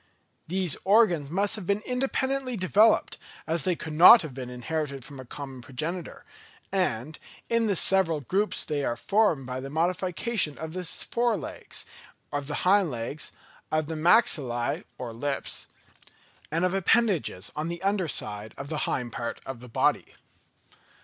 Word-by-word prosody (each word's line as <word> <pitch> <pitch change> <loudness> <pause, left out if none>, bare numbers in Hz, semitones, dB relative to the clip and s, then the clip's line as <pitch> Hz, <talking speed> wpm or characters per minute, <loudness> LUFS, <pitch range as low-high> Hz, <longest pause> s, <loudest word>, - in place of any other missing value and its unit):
These 180 -3 +1
organs 190 -8 +4
must 195 +5 +1
have 200 -5 -7
been 200 +2 0
independently 265 0 -1
developed, 205 +4 +3 0.3
as 160 -1 0
they 180 - +2
could 160 -1 -6
not 180 +7 +9
have 155 -5 -7
been 125 -1 -6
inherited 140 +1 -4
from 140 -2 -10
a 130 - -8
common 135 0 -8
progenitor; 155 +8 -5 0.5
and 155 - -1 0.3
in 230 -1 +3
the 200 - +1
several 175 -3 +3
groups 195 - 0
they 145 -2 -2
are 120 - 0
formed 195 - +1
by 130 0 -4
the 135 +1 -6
modification 180 +2 -1
of 160 0 -6
the 185 0 -4
fore 235 +6 0
legs, - - -5 0.5
of 145 -1 -3
the 145 - -3
hind 195 -1 +4
legs, 125 +4 -4 0.4
of 155 0 +1
the 160 - -5
maxillæ 155 - +2
or 120 -2 -6
lips, 140 +4 -3 0.8
and 165 +4 +1
of 180 - 0
appendages 190 - +1
on 150 +1 -2
the 170 +1 -5
under 195 -3 +1
side 105 -5 -2
of 140 +1 -7
the 155 -1 -2
hind 125 -2 -2
part 115 0 -4
of 135 -3 -6
the 125 +1 -12
body. - - 0
160 Hz, 160 wpm, -27 LUFS, 135-195 Hz, 0.8 s, not